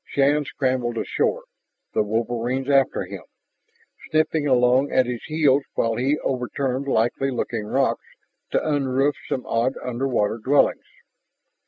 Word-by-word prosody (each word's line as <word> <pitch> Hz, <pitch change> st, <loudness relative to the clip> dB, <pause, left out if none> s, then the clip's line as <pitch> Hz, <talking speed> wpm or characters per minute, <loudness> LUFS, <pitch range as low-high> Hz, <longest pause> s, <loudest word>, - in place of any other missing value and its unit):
Shann 145 Hz, +2 st, +2 dB
scrambled 130 Hz, -4 st, -1 dB
ashore, -, -, -1 dB, 0.5 s
the -, -, +2 dB
wolverines 120 Hz, +5 st, -1 dB
after 135 Hz, -1 st, +3 dB
him, -, -, -8 dB, 0.9 s
sniffling 155 Hz, -1 st, +1 dB
along 130 Hz, +1 st, +3 dB
at 130 Hz, -, +3 dB
his 120 Hz, -1 st, -4 dB
heels 150 Hz, -3 st, +3 dB
while 115 Hz, 0 st, +1 dB
he 135 Hz, +4 st, +1 dB
overturned 130 Hz, +1 st, -2 dB
likely 120 Hz, +2 st, +1 dB
looking 115 Hz, -4 st, -3 dB
rocks -, -, 0 dB, 0.4 s
to -, -, 0 dB
unroof 140 Hz, -1 st, +1 dB, 0.2 s
some 130 Hz, -, -2 dB
odd 120 Hz, +4 st, 0 dB
underwater 120 Hz, -3 st, -1 dB
dwellings. 140 Hz, +6 st, +2 dB
130 Hz, 125 wpm, -23 LUFS, 120-140 Hz, 0.9 s, after